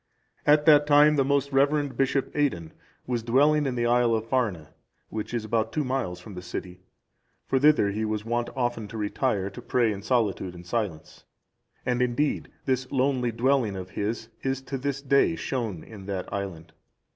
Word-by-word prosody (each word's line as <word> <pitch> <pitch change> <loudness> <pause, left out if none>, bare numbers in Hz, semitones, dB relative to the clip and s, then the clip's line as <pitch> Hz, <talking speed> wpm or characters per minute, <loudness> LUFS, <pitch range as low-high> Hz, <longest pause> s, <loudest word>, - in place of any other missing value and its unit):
At 150 0 +5
that 150 -2 +6
time, 150 +1 +6
the 140 - +3
most 140 +1 +1
reverend 140 0 +2
Bishop 135 +1 0
Aidan 90 - -1 0.3
was 120 -2 -1
dwelling 145 +5 +3
in 130 - -2
the 120 -1 0
Isle 120 -1 +3
of 110 0 -2
Farne,(369) 105 - -1 0.4
which 110 -1 -5
is 120 -2 -2
about 110 0 0
two 155 - -1
miles 125 -10 -2
from 100 +3 -11
the 90 - -7
city; 90 0 -7 0.7
for 135 - +1
thither 145 -8 +4
he 110 +2 -2
was 110 0 -2
wont 120 +1 -1
often 120 -4 -1
to 110 - -8
retire 105 -2 -1
to 125 - -9
pray 120 -2 +1
in 100 -1 -5
solitude 105 -6 0
and 90 0 -11
silence; 95 -5 -4 0.6
and, 125 0 0
indeed, 125 +4 0 0.2
this 130 -1 -1
lonely 130 -2 +1
dwelling 120 -2 +1
of 95 -1 -7
his 110 +3 -3
is 135 0 -1
to 135 0 -4
this 140 +1 -3
day 140 +4 +3
shown 115 - -3
in 100 -3 -11
that 95 -2 -4
island. 95 -5 -5
120 Hz, 180 wpm, -26 LUFS, 105-135 Hz, 0.7 s, that